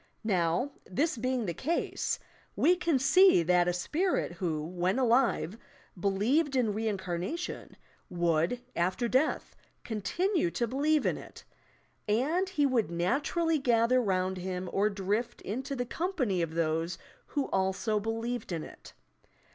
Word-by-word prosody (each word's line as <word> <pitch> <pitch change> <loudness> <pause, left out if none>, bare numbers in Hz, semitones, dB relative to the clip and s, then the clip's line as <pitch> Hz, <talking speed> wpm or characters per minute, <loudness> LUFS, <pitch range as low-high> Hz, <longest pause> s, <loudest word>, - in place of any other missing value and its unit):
Now, 185 +5 +1 0.2
this 290 - 0
being 255 0 -1
the 170 - -2
case, 315 - -1 0.4
we 355 - +4
can 340 -5 +1
see 320 - +6
that 175 +1 +3
a - - +3
spirit 305 - 0
who, 165 -3 -2
when 180 +4 -1
alive, 240 -5 +2 0.4
believed 240 - +1
in 235 -5 +2
reincarnation 200 - -3 0.3
would, 175 +5 +1
after 185 +7 0
death, 260 +6 0 0.3
continue 330 - 0
to 235 - -1
believe 290 +5 +1
in - - 0
it, - - -12 0.6
and 300 - +1
he 300 -7 +1
would 250 -6 +1
naturally 285 - 0
gather 245 -1 +3
round 190 -3 0
him 180 0 -4
or 205 +2 +3
drift 205 +4 -2
into 260 +7 -4
the 245 -1 -2
company 255 - -1
of 165 -1 -3
those 165 +1 0 0.3
who 285 -2 -1
also 190 +3 0
believed 225 +1 -3
in 165 -3 -2
it. - - -12
225 Hz, 135 wpm, -30 LUFS, 180-270 Hz, 0.6 s, see